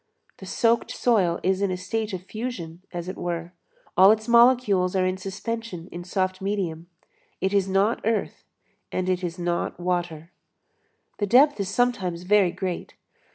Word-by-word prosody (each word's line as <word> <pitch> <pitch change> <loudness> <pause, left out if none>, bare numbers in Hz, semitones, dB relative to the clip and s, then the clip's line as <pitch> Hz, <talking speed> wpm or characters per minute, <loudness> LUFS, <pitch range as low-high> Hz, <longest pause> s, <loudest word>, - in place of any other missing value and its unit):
The 190 - -10
soaked 230 +4 +1
soil 190 -8 +1
is 190 +1 +1
in 200 - +1
a 185 - -2
state 215 +4 -3
of 185 -2 -5
fusion, 195 -6 -6
as 175 -1 -5
it 185 - -5
were; 170 0 -4 0.4
all 190 +1 +8
its 220 0 +2
molecules 235 -6 +4
are 185 -1 +2
in 185 0 0
suspension 195 -1 -5
in 175 0 -7
soft 185 +1 -2
medium; 185 -5 -3 0.5
it 190 +2 -1
is 195 -1 +2
not 195 +4 +2
earth 225 0 -1 0.5
and 185 0 -2
it 185 0 0
is 175 0 -3
not 175 0 -2
water. 175 -2 -2 0.9
The 205 - 0
depth 270 +4 +5
is 195 -2 -2
sometimes 195 -7 0
very 195 0 +4
great. 180 0 -5
190 Hz, 160 wpm, -25 LUFS, 175-215 Hz, 0.9 s, all